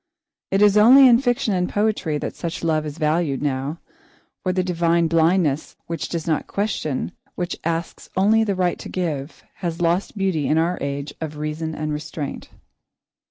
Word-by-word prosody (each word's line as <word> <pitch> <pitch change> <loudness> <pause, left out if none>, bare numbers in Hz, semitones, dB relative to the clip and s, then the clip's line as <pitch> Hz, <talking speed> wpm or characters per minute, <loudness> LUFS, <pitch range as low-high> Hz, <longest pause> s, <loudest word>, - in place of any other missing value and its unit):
It 195 +2 +3
is 205 0 +5
only 260 +6 +8
in 240 -1 +6
fiction 245 -4 +1
and 180 -1 0
poetry 205 -7 0
that - - -5
such 170 -1 -5
love 155 -2 +1
is 150 +1 -7
valued 155 -3 0
now, 140 +2 -2 0.6
for 185 - 0
the 185 0 0
divine 170 -1 +2
blindness 160 -2 +2
which 165 0 -4
does 165 -2 -3
not 160 -3 -1
question, 195 -8 -2 0.2
which 180 0 -3
asks 165 +1 -3
only 215 +4 +4
the 205 -3 0
right 180 -1 0
to - - -8
give, 160 -5 -4
has 170 -2 -3
lost 175 +5 0
beauty 185 -7 0
in 155 - +2
our 170 +2 +1
age 140 +1 -3
of 155 -1 -5
reason 155 +1 -3
and 155 0 -3
restraint. 150 -1 -5
170 Hz, 170 wpm, -22 LUFS, 155-190 Hz, 0.6 s, only